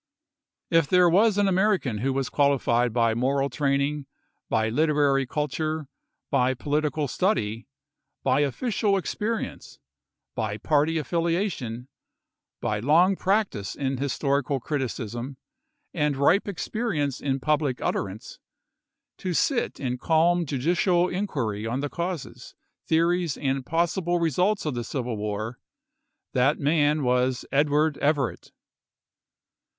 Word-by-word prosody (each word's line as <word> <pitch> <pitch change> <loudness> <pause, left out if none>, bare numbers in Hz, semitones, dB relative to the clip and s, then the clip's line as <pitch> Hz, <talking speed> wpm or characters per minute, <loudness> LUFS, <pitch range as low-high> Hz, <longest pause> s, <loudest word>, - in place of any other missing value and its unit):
If 165 -3 +4
there 180 +1 +5
was 205 +4 +4
an 205 -1 +3
American 190 - +1
who 135 +5 0
was 135 0 -1
qualified 125 -4 +2
by 115 0 +2
moral 135 +4 0
training, 140 0 0 0.4
by 110 - +1
literary 145 +1 +2
culture, 155 +1 -2 0.4
by 130 -1 +2
political 150 +2 -1
study, 115 - -1 0.6
by 130 +1 +2
official 200 - +1
experience, 215 +4 -4 0.6
by 110 -2 -2
party 155 +5 +1
affiliation, 165 - -2 0.7
by 105 -1 -1
long 165 - +4
practice 190 - -1
in 135 -1 -2
historical 140 0 0
criticism, 125 -1 -4 0.6
and 150 -4 0
ripe 165 +10 +3
ex 200 -4 -4
perience 155 - -2
in 135 -1 -1
public 150 -3 0
utterance, 100 +2 -4 0.8
to 180 -2 -2
sit 265 - 0
in 125 -2 -3
calm 170 +3 +2
judicial 175 +6 +1
inquiry 120 - -2
on 125 +4 -2
the 145 - -2
causes, 170 -2 -5 0.3
theories, 170 -1 +1
and 135 -2 -2
possible 175 +1 0
results 180 +6 +1
of 150 - -1
the 120 -1 -3
civil 125 -1 -3
war, 105 +3 -4 0.7
that 135 +4 +3
man 150 0 +2
was 125 0 +1
Edward 150 +1 +2
Everett. 140 -4 0
145 Hz, 115 wpm, -25 LUFS, 130-170 Hz, 0.8 s, there